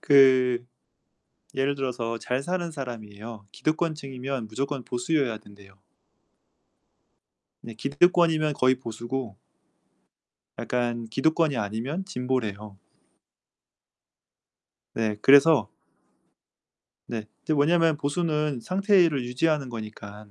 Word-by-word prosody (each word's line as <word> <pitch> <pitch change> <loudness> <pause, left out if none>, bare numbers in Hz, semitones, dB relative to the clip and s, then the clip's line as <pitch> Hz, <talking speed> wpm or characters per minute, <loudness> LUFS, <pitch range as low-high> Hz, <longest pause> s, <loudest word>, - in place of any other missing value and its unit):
그 130 -3 +5 0.9
예를 135 +1 0
들어서 120 -4 -3
잘 125 +3 -2
사는 175 +1 -2
사람이에요. 110 -5 -8
기득권층이면 140 -6 -3
무조건 135 +4 -3
보수여야 125 0 -1
된대요. 100 -2 -17 1.9
네 115 - -9
기득권이면 155 +4 +3
거의 130 -1 +3
보수고 120 -2 -5 1.2
약간 120 -1 -2
기득권이 150 +4 +1
아니면 115 - -3
진보래요. 110 - -3 2.2
네. 110 -2 -1
그래서 140 -4 +6 1.4
네. 110 -3 -5 0.2
이제 155 - 0
왜냐면 165 +2 +3
보수는 150 -2 -1
상태를 185 - +3
유지하는 140 +3 0
거니깐 105 -2 -9
130 Hz, 230 characters per minute, -26 LUFS, 115-150 Hz, 2.2 s, 그래서